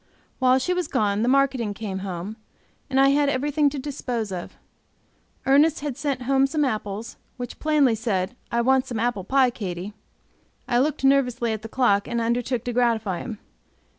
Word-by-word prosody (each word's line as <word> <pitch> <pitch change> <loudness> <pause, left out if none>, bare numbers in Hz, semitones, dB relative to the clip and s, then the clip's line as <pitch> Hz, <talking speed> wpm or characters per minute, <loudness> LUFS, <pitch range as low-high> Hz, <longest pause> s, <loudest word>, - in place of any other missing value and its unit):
While 255 0 +4
she 360 +8 0
was 360 -1 -1
gone 210 -6 0
the 235 - +1
marketing 260 -6 +2
came 200 -3 -4
home, 190 +2 -5 0.5
and 265 0 +1
I 275 0 +6
had 285 0 +3
everything 290 +2 +1
to 285 - -6
dispose 250 -6 -3
of. 180 -2 -6 0.9
Ernest 285 +4 +4
had 290 -3 -3
sent 275 -3 -2
home 270 +1 +3
some 295 +1 0
apples, 215 -2 -4 0.2
which 245 -1 -7
plainly 300 -5 +3
said, 220 -1 -1 0.2
"I 235 - +2
want 265 +2 +3
some 235 -4 -3
apple 230 -4 -1
pie, 260 +4 +3
Katy." 195 -3 -5 0.7
I 240 - +2
looked 290 +1 0
nervously 250 -4 +2
at 215 - -5
the 225 - -8
clock, 210 -5 +2
and 235 -1 -1
undertook 235 +1 -1
to 245 - -3
gratify 225 -6 +1
him. 225 -3 -6
245 Hz, 175 wpm, -24 LUFS, 220-275 Hz, 0.9 s, I